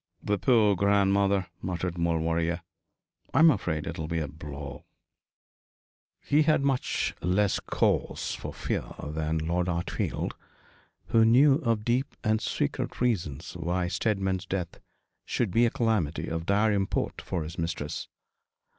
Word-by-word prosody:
'The 105 -1 0
poor 110 -4 +4
grandmother,' 100 0 +3 0.2
muttered 90 -1 -3
Maulevrier. 85 0 0 0.7
'I'm 160 0 +8
afraid 85 - -2
it - - -5
will 80 - -3
be 85 +1 -2
a 80 -2 -1
blow.' 70 -2 -8 1.4
He 150 +2 +4
had 155 -2 +3
much 135 -2 0
less 95 +3 +2
cause - - 0
for - - -6
fear - - -3
than 80 +1 -2
Lord 85 +3 0
Hartfield, 85 -1 -2 0.8
who 115 -1 +5
knew 135 +5 +6
of 115 -7 0
deep 125 +3 0
and 110 0 +2
secret - - -2
reasons 95 - -1
why 90 +1 -1
Steadman's 95 0 -1
death 90 -3 -3 0.4
should 115 -6 -1
be 120 +5 +4
a - - +2
calamity 110 -11 0
of 80 +1 -3
dire 105 +2 +3
import 100 -1 -1
for 90 -4 -3
his 80 +3 -7
mistress. 80 -2 -3
95 Hz, 135 wpm, -28 LUFS, 85-110 Hz, 1.4 s, I'm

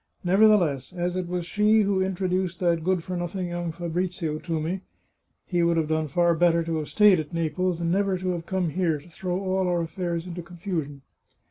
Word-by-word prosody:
Nevertheless, 180 -7 +3
as 175 0 -2
it 185 -1 -2
was 175 -1 -3
she 210 +3 +3
who 200 -2 +1
introduced 185 -1 -1
that 170 -3 +1
good 185 -1 +1
for 185 - -4
nothing 175 +1 -3
young 175 -1 -3
Fabrizio 170 -2 -3
to 165 -2 -2
me 175 +5 -3 0.3
— - - -50
he 175 -2 0
would 170 0 +2
have 160 -1 0
done 155 0 0
far 170 +4 +3
better 170 0 +3
to 165 0 -2
have 155 -1 -4
stayed 210 -4 +5
at 155 +2 -6
Naples, 165 +2 -1
and 170 -1 0
never 195 0 +1
to 185 0 -3
have 170 -1 -5
come 185 -3 0
here 170 -2 +1
to 145 - -15
throw 180 +1 -3
all 190 -1 0
our 175 -1 +1
affairs 170 0 -3
into 175 -1 -6
confusion. 170 -5 -5
175 Hz, 210 wpm, -26 LUFS, 165-185 Hz, 0.3 s, stayed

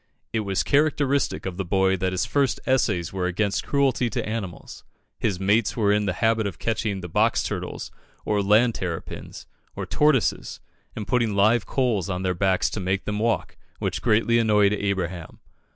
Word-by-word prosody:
It 110 - +1
was 100 -3 -1
characteristic 140 -1 +1
of 95 -2 -4
the 95 - -1
boy 95 +1 +2
that 95 0 -1
his 95 +3 -1
first 135 +2 +1
essays 105 -11 +1
were 90 -2 -1
against 100 +2 -1
cruelty 135 -4 +1
to 105 - -3
animals. 105 -5 -6 0.4
His 100 -5 -1
mates 105 +4 +1
were 105 -3 +3
in 105 0 +1
the 90 - 0
habit 110 -1 +2
of 95 - -6
catching 105 -3 -2
the 90 - -6
box 80 - +2
turtles, - - -5 0.3
or 105 -1 +1
land 110 +4 +4
terrapins, 85 -5 -6 0.3
or - - -4
tortoises, 150 -7 +1 0.4
and 105 - -5
putting 120 -4 +1
live 110 +3 +3
coals 115 -9 0
on 90 0 -2
their 90 -1 +1
backs 95 0 +1
to 105 - -4
make 95 +1 -1
them 105 0 -2
walk, 115 +1 -1 0.2
which - - -3
greatly 115 +2 +3
annoyed 105 -3 +3
Abraham. 95 -4 -3
105 Hz, 175 wpm, -24 LUFS, 95-115 Hz, 0.4 s, land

